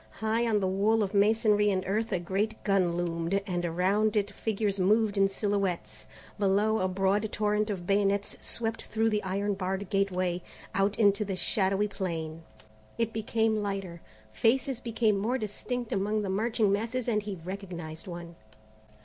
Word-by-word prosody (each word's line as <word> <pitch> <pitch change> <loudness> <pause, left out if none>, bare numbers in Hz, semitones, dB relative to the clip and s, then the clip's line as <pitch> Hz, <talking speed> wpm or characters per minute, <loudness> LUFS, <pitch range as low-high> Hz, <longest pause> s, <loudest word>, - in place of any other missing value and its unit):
High 225 +2 +1
on 215 -2 +2
the 190 - +1
wall 210 +4 +2
of 200 0 -3
masonry 210 0 +4
and 190 -2 0
earth 220 +4 -1
a 190 - +2
great 195 +5 -2
gun 190 -4 +2
loomed, 170 +2 0
and 175 -3 -2
around 190 +6 +1
it 205 -1 +1
figures 205 -1 -1
moved 210 +2 +3
in 195 -1 +4
silhouettes. 185 - -2 0.3
Below, 210 +2 +2
a 185 - +1
broad 195 +3 +1
torrent 210 0 +1
of 185 -4 -3
bayonets 200 +1 +1
swept 225 -1 -3
through 225 0 +1
the 210 -1 +1
iron 200 +2 -1
barred 190 0 -3
gateway, 185 -3 0 0.3
out 195 +1 +1
into 205 -1 +4
the 195 -2 -3
shadowy 195 +2 +1
plain. 165 -5 -4 0.6
It 230 -1 0
became 220 0 +1
lighter. 195 -4 -4 0.3
Faces 255 - +1
grew 225 -2 +1
more 215 +6 0
distinct 240 +2 -4
among 210 +2 0
the 195 - -2
marching 215 +1 +1
masses 230 +5 -1
and 215 -3 +2
he 205 -1 -5
recognized 175 -4 -6
one. 170 -1 -7
200 Hz, 160 wpm, -29 LUFS, 190-215 Hz, 0.6 s, masonry